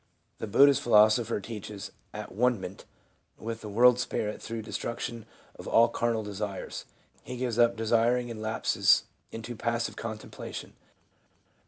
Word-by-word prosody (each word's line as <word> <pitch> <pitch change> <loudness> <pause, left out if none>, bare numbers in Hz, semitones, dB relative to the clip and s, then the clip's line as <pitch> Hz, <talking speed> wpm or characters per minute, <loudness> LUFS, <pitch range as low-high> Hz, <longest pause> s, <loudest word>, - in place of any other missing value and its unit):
The 110 - -4
Buddhist 140 +6 +6
philosopher 110 0 +4
teaches 105 -1 -7 0.2
at - - -7
one 125 +2 +2
ment 95 +1 -8 0.5
with 115 0 -5
the 105 - -7
world 120 +4 +5
spirit 105 -3 -2
through 115 -1 -5
the 110 - -10
destruc 115 - -3
tion 115 -2 -5 0.3
of - - -11
all 115 +1 +5
carnal 115 -1 0
desires; 105 -1 -5 0.4
he 125 - -7
gives 120 -2 -2
up 120 0 +5
desiring 115 +2 +2
and 110 -2 -7
lapses 110 0 +3 0.3
into 115 +2 -6
passive 115 +1 -1
contemplation. 110 -1 -7
115 Hz, 145 wpm, -29 LUFS, 110-120 Hz, 0.5 s, Buddhist